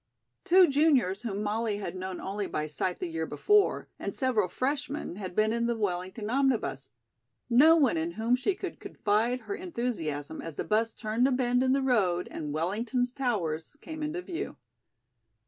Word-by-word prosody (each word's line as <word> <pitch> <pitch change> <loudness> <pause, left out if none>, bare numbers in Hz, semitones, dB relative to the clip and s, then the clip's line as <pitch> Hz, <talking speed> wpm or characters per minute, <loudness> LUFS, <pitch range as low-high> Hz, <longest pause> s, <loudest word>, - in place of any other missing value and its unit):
Two 365 +1 +7
juniors 275 - +3
whom 210 -3 -3
Molly 215 0 -1
had 205 - -5
known 185 0 -5
only 200 +1 -3
by 150 - -2
sight 175 +4 -2
the - - -3
year 160 -1 -3
before 415 0 +2
and - - -4
several 245 -7 +2
freshmen 275 - -3
had 185 -3 -6
been 215 +1 +3
in 235 0 0
the 235 - 0
Wellington 190 +1 -2
omnibus; 245 - 0 0.6
no 300 +7 +7
one 275 - +3
in 165 +1 -2
whom 225 +4 +2
she 315 +10 0
could - - -6
confide 225 +5 0
her 215 -2 -5
enthusiasm 235 - -3
as 165 -3 -7
the - - -2
'bus 225 +1 +1
turned 225 +3 +1
a - - +1
bend 250 -1 +2
in 260 0 +3
the 275 0 +1
road 190 -9 +2
and 150 -2 -5
Wellington's 225 - -1
towers 195 - -2
came 315 0 -8
into 310 +4 -3
view. 350 -2 -5
225 Hz, 175 wpm, -29 LUFS, 185-260 Hz, 0.6 s, Two